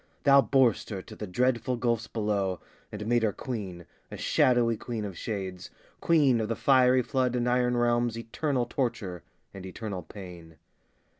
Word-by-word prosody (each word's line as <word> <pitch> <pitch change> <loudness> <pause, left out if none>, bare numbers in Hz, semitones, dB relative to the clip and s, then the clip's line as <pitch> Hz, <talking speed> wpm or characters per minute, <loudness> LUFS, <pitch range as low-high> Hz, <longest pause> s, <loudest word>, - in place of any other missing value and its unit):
Thou 140 -1 +7
bor'st 130 -5 +2
her 95 -4 -5
to 110 - -12
the 105 - -6
dreadful 125 +5 0
gulfs 115 -2 0
below, 100 -5 -1 0.3
And 105 0 -6
made 120 +1 +2
her 110 -2 +2
queen, 95 -8 -6 0.2
a - - -8
shadowy 120 -2 +3
queen 110 -1 -5
of 100 -3 -6
shades, 95 -3 -5 0.3
Queen 140 -8 +3
of 110 - -3
the 115 - 0
fiery 130 0 +4
flood 125 -1 0
and 120 0 0
iron 125 0 +2
realms, 120 -1 +1
Eternal 125 +3 -1
torture 115 -8 -3 0.3
and 95 - -9
eternal 95 0 -6
pain. 85 -3 -11
115 Hz, 160 wpm, -28 LUFS, 100-125 Hz, 0.3 s, Thou